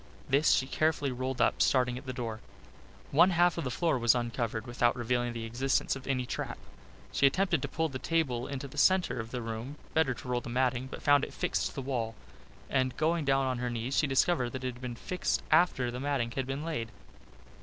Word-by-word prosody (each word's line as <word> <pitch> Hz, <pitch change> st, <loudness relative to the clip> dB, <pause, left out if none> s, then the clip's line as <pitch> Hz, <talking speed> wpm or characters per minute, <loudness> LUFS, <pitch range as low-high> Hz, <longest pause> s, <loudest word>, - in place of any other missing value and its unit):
This 140 Hz, +3 st, +3 dB
she 130 Hz, -, +3 dB
carefully 145 Hz, 0 st, 0 dB
rolled 130 Hz, +1 st, -3 dB
up, -, -, +2 dB
starting 125 Hz, -2 st, +3 dB
at 130 Hz, +2 st, -9 dB
the -, -, -2 dB
door. 115 Hz, -3 st, -4 dB, 0.7 s
One 170 Hz, +6 st, +6 dB
half 175 Hz, -1 st, +3 dB
of -, -, -2 dB
the 130 Hz, -, -2 dB
floor 135 Hz, +1 st, 0 dB
was 120 Hz, +1 st, +4 dB
uncovered 120 Hz, -2 st, -2 dB
without 120 Hz, -1 st, +1 dB
revealing 120 Hz, 0 st, 0 dB
the 115 Hz, -1 st, -5 dB
existence 130 Hz, +5 st, 0 dB
of 135 Hz, -1 st, -9 dB
any 130 Hz, -2 st, 0 dB
trap. -, -, -4 dB, 0.5 s
She 140 Hz, -, +4 dB
attempted 175 Hz, +1 st, +1 dB
to -, -, -2 dB
pull 160 Hz, -1 st, -1 dB
the 135 Hz, -4 st, -6 dB
table 130 Hz, -8 st, 0 dB
into 140 Hz, 0 st, -5 dB
the -, -, -6 dB
centre 180 Hz, -10 st, +3 dB
of 115 Hz, 0 st, -5 dB
the 125 Hz, -1 st, -4 dB
room, 115 Hz, +5 st, -5 dB, 0.2 s
better 155 Hz, -6 st, +2 dB
to 130 Hz, -, -10 dB
roll 125 Hz, -1 st, 0 dB
the 120 Hz, -, -8 dB
matting, 125 Hz, +1 st, 0 dB
but -, -, -9 dB
found 145 Hz, -1 st, +5 dB
it -, -, -5 dB
fixed -, -, 0 dB
to -, -, -10 dB
the 135 Hz, -, -4 dB
wall, 120 Hz, -4 st, -2 dB, 0.5 s
and 130 Hz, -2 st, 0 dB
going 160 Hz, 0 st, +1 dB
down 135 Hz, -1 st, +3 dB
on 130 Hz, -2 st, -1 dB
her 125 Hz, 0 st, -1 dB
knees, 120 Hz, +3 st, -3 dB
she 150 Hz, -, +3 dB
discovered 135 Hz, -2 st, +2 dB
that 130 Hz, 0 st, -5 dB
it 130 Hz, -1 st, -2 dB
had 120 Hz, -, -14 dB
been 125 Hz, -2 st, -5 dB
fixed 175 Hz, +6 st, -2 dB
after 155 Hz, -7 st, +3 dB
the 125 Hz, -, -5 dB
matting 135 Hz, -4 st, -1 dB
had 130 Hz, +2 st, -3 dB
been 135 Hz, +3 st, -3 dB
laid. 135 Hz, -9 st, -3 dB
130 Hz, 225 wpm, -30 LUFS, 120-145 Hz, 0.7 s, One